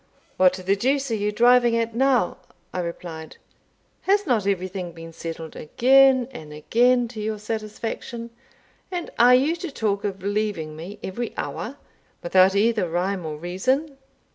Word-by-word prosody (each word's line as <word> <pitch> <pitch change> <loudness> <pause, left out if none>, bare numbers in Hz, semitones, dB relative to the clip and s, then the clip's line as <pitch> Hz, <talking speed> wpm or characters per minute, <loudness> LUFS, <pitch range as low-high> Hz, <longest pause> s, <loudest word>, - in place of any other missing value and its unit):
"What 185 -1 +5
the 185 +1 0
deuce 270 +5 0
are - - +1
you 210 0 -1
driving 240 +1 +4
at 230 0 -1
now?" 255 -5 +2 0.4
I 185 - -2
replied. 170 -2 -6 0.7
"Has 405 +1 +4
not 230 - +1
everything 185 -2 -2
been 165 0 -10
settled 165 -1 -7
again 260 - +4
and 155 - -10
again 240 +11 +2
to 220 -3 -7
your 215 0 -2
satisfaction? 225 +2 -5 0.6
And 355 -2 -4
are 245 +1 +8
you 285 +6 +2
to 345 0 -5
talk 210 -7 -1
of 195 -2 -4
leaving 200 -7 -2
me 175 +6 -8
every 235 +5 -4
hour, - - -5 0.5
without 185 +2 +4
either 215 -3 +2
rhyme 180 +1 -1
or 150 -1 -5
reason?" 260 - -1
210 Hz, 150 wpm, -24 LUFS, 180-245 Hz, 0.7 s, are